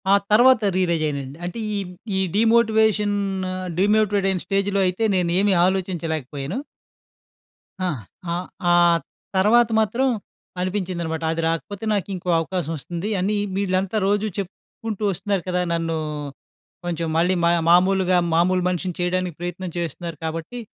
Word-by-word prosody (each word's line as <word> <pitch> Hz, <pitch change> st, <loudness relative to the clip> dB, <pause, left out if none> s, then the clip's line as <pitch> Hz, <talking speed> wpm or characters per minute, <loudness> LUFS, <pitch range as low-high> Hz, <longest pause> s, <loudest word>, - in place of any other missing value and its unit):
ఆ -, -, +6 dB, 0.2 s
తర్వాత 245 Hz, +2 st, +6 dB
రియలైజయ్యనండి. 155 Hz, -6 st, -1 dB
అంటే 180 Hz, +6 st, -5 dB, 0.2 s
ఈ -, -, 0 dB, 0.4 s
ఈ -, -, +1 dB, 0.2 s
డీమోటివేషను 220 Hz, -2 st, +3 dB, 0.6 s
డీమోటివేటయిన 200 Hz, -1 st, +2 dB
స్టేజ్‌లో 195 Hz, +1 st, 0 dB
అయితే 185 Hz, +5 st, -1 dB
నేనేమి 185 Hz, +3 st, +2 dB
ఆలోచించలేకపోయను. 165 Hz, -, -2 dB, 1.3 s
ఆ! -, -, +1 dB, 0.5 s
ఆ! -, -, 0 dB, 0.4 s
ఆ -, -, +6 dB, 0.6 s
తర్వాత 220 Hz, +4 st, +5 dB
మాత్రం 235 Hz, +5 st, +1 dB, 0.5 s
అనిపించిందనమాట. 180 Hz, -4 st, -2 dB
అది 165 Hz, -, -2 dB
రాకపోతే 190 Hz, +5 st, -4 dB
నాకు 200 Hz, -4 st, -1 dB
ఇంకో 180 Hz, 0 st, -5 dB
అవకాశం 165 Hz, -1 st, -2 dB
వస్తుంది 170 Hz, +7 st, -5 dB
అని 200 Hz, +4 st, 0 dB, 0.2 s
వీళ్ళంతా 190 Hz, +1 st, 0 dB
రోజూ 205 Hz, +1 st, +1 dB
చెప్పుకుంటూ 210 Hz, +2 st, -6 dB
వస్తున్నారు 195 Hz, 0 st, -2 dB
కదా! 180 Hz, 0 st, +1 dB
నన్ను 165 Hz, -1 st, -1 dB, 0.9 s
కొంచెం 170 Hz, -1 st, -2 dB
మళ్ళీ 175 Hz, +3 st, +3 dB
మ -, -, +5 dB, 0.2 s
మామూలుగా 185 Hz, +1 st, +4 dB, 0.2 s
మామూలు 180 Hz, +2 st, +3 dB
మనిషిని 180 Hz, 0 st, -2 dB
చేయడానికి 180 Hz, -1 st, -1 dB
ప్రయత్నం 175 Hz, +1 st, -4 dB
చేస్తున్నారు. 170 Hz, 0 st, -4 dB
కాబట్టి 165 Hz, +9 st, -4 dB
185 Hz, 120 wpm, -22 LUFS, 170-205 Hz, 1.3 s, ఆ